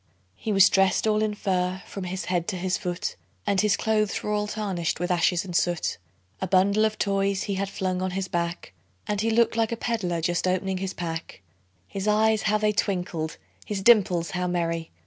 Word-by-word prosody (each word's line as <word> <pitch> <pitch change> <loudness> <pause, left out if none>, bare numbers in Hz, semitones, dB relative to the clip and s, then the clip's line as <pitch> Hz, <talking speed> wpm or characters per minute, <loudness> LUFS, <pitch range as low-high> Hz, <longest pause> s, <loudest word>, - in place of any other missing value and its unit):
He 220 - -4
was 195 -1 +7
dressed 195 +1 +3
all 215 -1 +2
in 215 -1 0
fur 185 -2 -1
from 195 -2 -6
his 185 +1 -4
head 175 -2 -1
to 205 - -2
his 185 0 -1
foot, 180 0 -3 0.3
And 200 -2 +2
his 210 -1 +2
clothes 215 -2 0
were 210 - -2
all 210 0 0
tarnished 195 -7 -2
with 180 +1 -1
ashes 175 +1 +2
and 180 -2 -6
soot; 175 - 0 0.4
A 190 - -1
bundle 200 +4 +4
of 215 0 -1
toys 195 -1 0
he 200 - -2
had 195 0 -2
flung 185 -2 -2
on 185 - 0
his 195 -1 -2
back, 170 - -3 0.3
And 205 -1 -1
he 225 - +1
looked 225 0 +3
like 225 -1 +1
a 230 - -2
peddler 205 -8 -1
just 175 +2 0
opening 185 +1 0
his 190 0 -4
pack; 165 - -5 0.4
His 195 - -4
eyes 215 +1 +3
how 215 0 +2
they 215 0 +2
twinkled! 180 -6 -2 0.3
his 200 -2 -4
dimples 185 -7 +4
how 180 -1 -1
merry! 165 -2 -1
190 Hz, 205 wpm, -26 LUFS, 180-210 Hz, 0.4 s, was